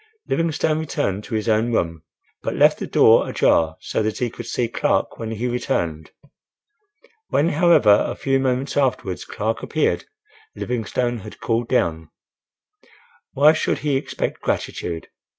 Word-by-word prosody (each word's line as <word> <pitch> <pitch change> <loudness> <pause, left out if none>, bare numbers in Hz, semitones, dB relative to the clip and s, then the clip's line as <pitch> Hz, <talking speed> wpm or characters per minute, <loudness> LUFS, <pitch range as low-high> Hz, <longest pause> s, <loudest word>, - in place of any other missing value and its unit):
Livingstone 160 -1 0
returned 105 -10 -2
to 115 - -4
his 110 0 -2
own 110 +2 +2
room; 85 -7 -1 0.4
but - - -3
left - - +4
the - - -4
door - - +5
ajar 80 -1 +2
so - - -2
that 110 0 -1
he 120 -2 -1
could - - -8
see 120 - -1
Clark 115 - -1
when 115 - -4
he 115 +2 -3
returned. 85 - -2 1.2
When, 155 +4 +2
however, 150 - +5
a - - -4
few 135 0 0
moments 130 +1 -1
afterwards 125 -9 -1
Clark 110 +2 -3
appeared 155 - 0 0.5
Livingstone 120 0 -2
had 105 +1 -11
cooled 115 0 -1
down. 80 -10 0 1.2
Why 150 +3 +6
should 155 - 0
he 145 -2 +2
expect 135 - -3
gratitude? 85 -2 -3
120 Hz, 145 wpm, -22 LUFS, 105-135 Hz, 1.2 s, Why